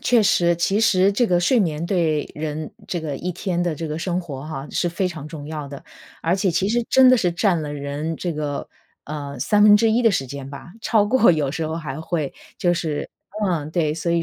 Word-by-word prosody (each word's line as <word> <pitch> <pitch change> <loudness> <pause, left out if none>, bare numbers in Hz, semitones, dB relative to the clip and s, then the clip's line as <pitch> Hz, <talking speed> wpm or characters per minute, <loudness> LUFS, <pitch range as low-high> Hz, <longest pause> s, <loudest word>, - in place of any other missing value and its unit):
确 240 -3 +3
实， 175 -3 +3
其 195 +5 +1
实 195 -3 +4
这 240 +4 +2
个 180 -4 +2
睡 230 +7 +3
眠 160 -3 -1
对 165 -5 +1
人 155 0 -4
这 175 - -3
个， 150 -3 -4
一 180 +6 -3
天 175 0 -2
的 175 -3 -1
这 160 +2 -5
个 155 +1 -4
生 175 +1 -1
活 140 -6 -7
哈， 145 -3 -6
是 175 - 0
非 175 +3 -1
常 155 -4 -8
重 150 -2 -8
要 150 -2 -5
的， 140 0 -10 0.4
而 165 +2 +2
且 195 -1 +1
其 180 +3 0
实 240 +3 +1
真 260 -1 +6
的 255 - +6
是 180 -7 +1
占 175 -1 +1
了 145 -1 -5
人 145 +3 -4
这 175 +1 -3
个， 150 -2 -3 0.4
呃， 145 -2 -6
1/3 210 +2 +5
的 225 - +5
时 135 -8 -1
间 135 +1 -7
吧， 140 +5 -10
超 220 -2 +3
过 230 +1 +5
有 150 -5 0
时 160 +1 -2
候 160 - -3
还 155 -3 -5
会 160 -3 -2 0.2
就 175 -1 +2
是 160 -4 -3 0.3
嗯， 160 -6 -1
对， 160 -3 +1
所 165 +2 -2
以 170 0 +2
170 Hz, 235 characters per minute, -22 LUFS, 150-190 Hz, 0.4 s, 真